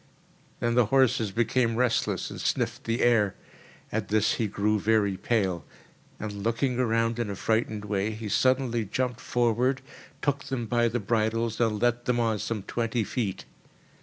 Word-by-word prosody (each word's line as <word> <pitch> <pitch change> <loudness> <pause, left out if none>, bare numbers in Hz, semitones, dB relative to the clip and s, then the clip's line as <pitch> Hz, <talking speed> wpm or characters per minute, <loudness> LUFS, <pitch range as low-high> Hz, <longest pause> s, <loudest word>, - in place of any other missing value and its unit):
Then 120 0 +1
the 120 -2 +4
horses 130 -4 +3
became 115 +1 +1
restless 125 -1 0
and - - -6
sniffed - - -1
the 115 +1 0
air. 110 -5 +3 0.6
At 110 -2 -2
this 110 0 +2
he 110 - 0
grew 105 +1 0
very 105 -2 +2
pale, 95 -4 0 0.6
and, 105 -1 -5
looking 120 +4 0
around 115 -1 +1
in 115 -3 -1
a 100 - -3
frightened 110 0 -1
way, 105 0 0
he 110 0 -5
suddenly 125 +1 +2
jumped 125 +4 -2
forward, 125 +2 +1 0.4
took 145 0 0
them 130 -4 -3
by 120 +1 +2
the 120 +1 -1
bridles 115 +1 0
and 110 -3 +1
led 120 +1 +1
them 125 -1 +1
on 110 -2 +1
some 110 -2 -3
twenty 115 +1 -1
feet. 105 -3 -3
115 Hz, 165 wpm, -27 LUFS, 105-120 Hz, 0.6 s, the